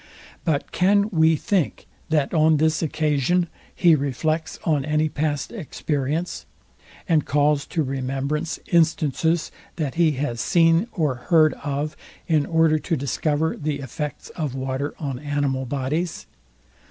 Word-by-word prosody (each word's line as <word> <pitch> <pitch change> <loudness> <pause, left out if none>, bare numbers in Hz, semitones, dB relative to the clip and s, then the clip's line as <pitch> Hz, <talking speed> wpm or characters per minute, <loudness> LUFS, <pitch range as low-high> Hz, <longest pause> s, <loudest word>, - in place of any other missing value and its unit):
But 155 -4 -1
can 200 +5 +3
we 160 -2 +4
think, 185 0 -1 0.2
that 150 -1 +1
on 160 -1 +4
this 155 +1 +2
occasion 155 +2 +1 0.3
he 170 -2 +5
reflects 155 +3 -1
on 150 -4 +1
any 155 +1 +1
past 145 -1 -2
experience, 155 - -3 0.6
and 160 -5 +3
calls 145 0 +1
to 160 - -1
remembrance 135 +4 -2
instances, 160 0 +2 0.2
that 150 -6 -2
he 160 -3 +4
has 130 -4 -2
seen 165 +3 +3
or 155 -8 0 0.2
heard 160 -3 +5
of, 145 +1 -3 0.3
in 155 -4 +2
order 160 -1 +3
to 165 +1 -1
discover 145 +3 0
the 150 -1 -2
effects 145 +2 -6
of 150 -6 -4
water 135 +2 -3
on 135 -5 -4
animal 145 -2 -1
bodies? 145 +6 -2
155 Hz, 130 wpm, -23 LUFS, 140-160 Hz, 0.6 s, he